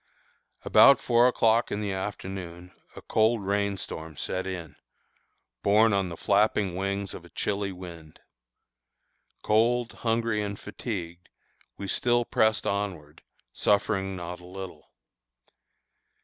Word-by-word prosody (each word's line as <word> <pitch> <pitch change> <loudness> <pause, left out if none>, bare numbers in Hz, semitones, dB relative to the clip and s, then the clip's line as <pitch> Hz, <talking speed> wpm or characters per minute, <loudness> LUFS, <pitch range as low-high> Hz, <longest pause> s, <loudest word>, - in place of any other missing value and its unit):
About 140 -2 +7
four 120 0 +4
o'clock 115 -2 +2
in 100 - -1
the 105 -2 -2
afternoon 95 -2 -6 0.2
a - - -10
cold 110 -1 +2
rain 100 0 0
storm 80 -4 -7
set 95 0 -3
in, 85 -5 -6 0.9
borne 105 +2 +4
on 95 -2 +1
the 85 - -7
flapping 100 -2 +2
wings 100 +1 -2
of - - -9
a - - -15
chilly 100 -1 -2
wind. 85 -4 -11 1.2
Cold, 120 +2 +2
hungry, 115 -2 0
and 100 -1 -4
fatigued, 90 -6 -6 0.5
we 100 - -5
still 120 +4 +1
pressed 110 -2 +2
onward, 90 -7 -3 0.3
suffering 100 -2 +1
not 90 0 -6
a 90 - -14
little. 95 0 -9
100 Hz, 120 wpm, -27 LUFS, 90-110 Hz, 1.2 s, About